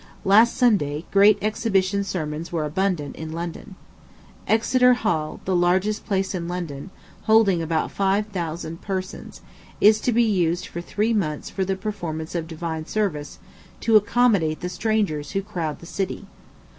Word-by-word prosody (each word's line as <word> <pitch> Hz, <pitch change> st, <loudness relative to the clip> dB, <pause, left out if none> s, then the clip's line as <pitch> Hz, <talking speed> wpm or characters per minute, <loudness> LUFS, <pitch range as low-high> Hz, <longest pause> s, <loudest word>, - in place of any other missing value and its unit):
Last 220 Hz, +5 st, +5 dB
Sunday, 165 Hz, -, +2 dB
"great 200 Hz, +1 st, +6 dB
exhibition" 200 Hz, -2 st, +1 dB
sermons 160 Hz, -4 st, -4 dB
were 165 Hz, -3 st, -1 dB
abundant 165 Hz, -2 st, -1 dB
in 160 Hz, 0 st, -6 dB
London. 170 Hz, +3 st, -6 dB, 0.7 s
Exeter 250 Hz, +3 st, +4 dB
Hal, 160 Hz, -10 st, -2 dB
the 185 Hz, -, 0 dB
largest 185 Hz, +4 st, +1 dB
place 195 Hz, -2 st, 0 dB
in 170 Hz, -2 st, -3 dB
London, 175 Hz, -3 st, -5 dB, 0.4 s
holding 220 Hz, -6 st, +4 dB
about 160 Hz, -1 st, -1 dB
five 195 Hz, +1 st, +1 dB
thousand 170 Hz, -4 st, -5 dB
persons, 190 Hz, -2 st, -5 dB, 0.4 s
is 215 Hz, +1 st, +5 dB
to 245 Hz, -, +1 dB
be 235 Hz, +1 st, +3 dB
used 180 Hz, -5 st, +1 dB
for 170 Hz, -, -6 dB
three 210 Hz, +6 st, -1 dB
months 155 Hz, -9 st, -2 dB
for 195 Hz, -, -1 dB
the 190 Hz, +1 st, -1 dB
performance 170 Hz, -6 st, -5 dB
of 165 Hz, -2 st, -3 dB
divine 160 Hz, -1 st, -5 dB
service, 160 Hz, -9 st, -2 dB, 0.4 s
to 225 Hz, -1 st, +3 dB
accommodate 205 Hz, -7 st, +3 dB
the 180 Hz, -, -3 dB
strangers 180 Hz, -7 st, -1 dB
who 195 Hz, -1 st, -1 dB
crowd 170 Hz, -7 st, -4 dB
the -, -, -13 dB
city. 195 Hz, +3 st, -4 dB
185 Hz, 150 wpm, -23 LUFS, 165-210 Hz, 0.7 s, great